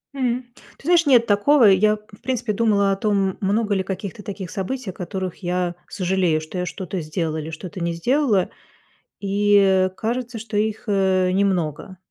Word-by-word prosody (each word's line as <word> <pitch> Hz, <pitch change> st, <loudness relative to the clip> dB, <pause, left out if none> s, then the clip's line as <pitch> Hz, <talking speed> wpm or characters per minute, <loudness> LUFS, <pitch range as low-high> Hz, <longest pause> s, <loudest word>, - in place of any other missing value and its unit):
М, 250 Hz, -1 st, -1 dB, 0.3 s
ты -, -, -19 dB
знаешь, 340 Hz, -1 st, +4 dB
нет 245 Hz, -4 st, +5 dB
такого. 230 Hz, +5 st, +4 dB
Я, 210 Hz, +2 st, +5 dB
в 210 Hz, -1 st, -19 dB
принципе, 240 Hz, -4 st, -2 dB
думала 200 Hz, -2 st, +2 dB
о -, -, +2 dB
том, 195 Hz, -2 st, 0 dB
много 205 Hz, +2 st, +1 dB
ли 190 Hz, -, 0 dB
каких-то 195 Hz, +3 st, -6 dB
таких 195 Hz, -3 st, -6 dB
событий, 210 Hz, +3 st, -4 dB
о -, -, -18 dB
которых 185 Hz, 0 st, -5 dB
я 175 Hz, 0 st, -1 dB
сожалею, 180 Hz, -4 st, 0 dB
что 160 Hz, +4 st, -7 dB
я 180 Hz, -, -1 dB
что-то 185 Hz, -1 st, -5 dB
сделала 155 Hz, 0 st, -2 dB
или 155 Hz, +1 st, -5 dB
что-то 175 Hz, +3 st, -7 dB
не 170 Hz, 0 st, -1 dB
сделала, 230 Hz, -, +1 dB, 0.7 s
и 195 Hz, -2 st, +3 dB
кажется, 240 Hz, +1 st, -3 dB
что 215 Hz, -1 st, -6 dB
их, 215 Hz, +1 st, -1 dB
э, 190 Hz, -2 st, +2 dB
немного. 185 Hz, -2 st, -1 dB
195 Hz, 170 wpm, -22 LUFS, 185-220 Hz, 0.7 s, нет